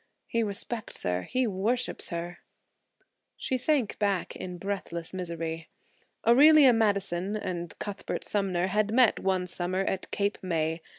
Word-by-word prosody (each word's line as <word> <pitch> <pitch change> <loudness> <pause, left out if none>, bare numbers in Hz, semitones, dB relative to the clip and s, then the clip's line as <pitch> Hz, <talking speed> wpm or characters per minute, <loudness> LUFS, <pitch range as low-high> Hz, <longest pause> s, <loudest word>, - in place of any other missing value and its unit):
He 230 - -1
respects 220 +2 -3
her; 90 0 0
he 255 - -1
worships 225 +5 -1
her–" 175 0 -5 1.0
She 260 - -2
sank 255 -3 0
back 200 -4 0
in 180 -1 -6
breathless 180 -3 -4
misery. 165 -3 -4 0.6
Aurelia 280 +2 +7
Madison 200 -3 0
and 175 -5 -4
Cuthbert 205 -1 -5
Sumner 190 -4 0
had 210 +2 0
met 245 -1 +4
one 185 -1 0
summer 180 +1 -1
at 190 -1 -2
Cape 200 0 -1
May. 165 -2 -1
195 Hz, 130 wpm, -28 LUFS, 175-220 Hz, 1.0 s, Aurelia